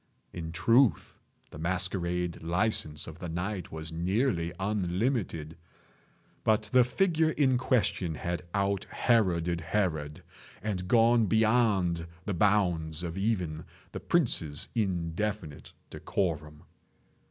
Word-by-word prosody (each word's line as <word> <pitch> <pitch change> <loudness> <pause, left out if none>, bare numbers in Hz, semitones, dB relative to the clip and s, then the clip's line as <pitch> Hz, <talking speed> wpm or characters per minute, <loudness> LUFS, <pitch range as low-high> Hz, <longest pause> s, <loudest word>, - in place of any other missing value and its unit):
In 80 -2 -5
truth 115 +1 +3 0.4
the 75 - -9
masquerade 90 0 -1
license 85 -3 0
of 80 +1 -10
the 90 - -5
night 90 +3 -4
was 80 0 -6
nearly 85 +1 0
unlimited; 95 - -1 0.9
but 110 0 +3
the 125 -1 +7
figure 160 +4 +2
in 130 -5 +2
question 105 -9 +1
had 85 +3 -3
out 100 0 0
Heroded 90 -8 +1
Herod, 80 -5 -2 0.4
and 95 -4 -3
gone 115 +1 +4
beyond 105 -6 +2 0.2
the 100 - -1
bounds 90 -5 +1
of 85 -1 -4
even 90 -6 -1 0.3
the - - -5
prince's 85 - +1
indefinite 95 -3 -2 0.2
decorum. 75 -5 -3
90 Hz, 110 wpm, -29 LUFS, 85-110 Hz, 0.9 s, the